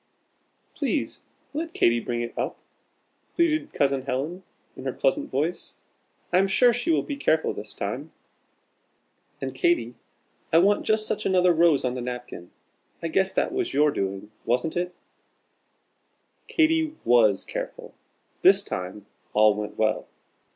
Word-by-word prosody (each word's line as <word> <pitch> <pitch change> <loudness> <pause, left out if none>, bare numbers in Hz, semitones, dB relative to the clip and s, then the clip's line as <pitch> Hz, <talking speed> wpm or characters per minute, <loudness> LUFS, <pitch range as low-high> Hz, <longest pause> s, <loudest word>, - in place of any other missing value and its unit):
"Please - - -2 0.3
let 320 +2 -4
Katy 120 0 +3
bring 120 0 -3
it 120 - -7
up!" - - -3 0.8
pleaded 310 -3 +1
Cousin 135 -1 +1
Helen, 140 +7 -3 0.3
in - - -9
her - - -1
pleasant 300 -13 0
voice, 160 - -2 0.6
"I 180 - +6
am 195 - +3
sure 240 +5 +5
she 240 +8 -2
will 325 - +3
be 285 - -4
careful 280 - +1
this - - -8
time. - - -4 1.3
And - - -3
Katy, 345 -1 +1 0.6
I 165 - +5
want 200 +4 +3
just 215 0 +2
such - - -2
another 180 -2 +4
rose 165 -5 +4
on 125 - 0
the 125 - -4
napkin. 125 -7 -6 0.5
I 165 - -1
guess 190 +3 +2
that - - 0
was 375 -2 -2
your 150 +1 +4
doing 100 -2 -4
wasn't 125 +7 0
it?" 180 0 -2 1.5
Katy 320 -1 +2
was 110 -5 +4
careful. - - -6 0.5
This - - +6
time 95 +3 -5 0.3
all 105 0 +5
went 105 0 -6
well. 110 -1 0
165 Hz, 145 wpm, -25 LUFS, -, 1.5 s, I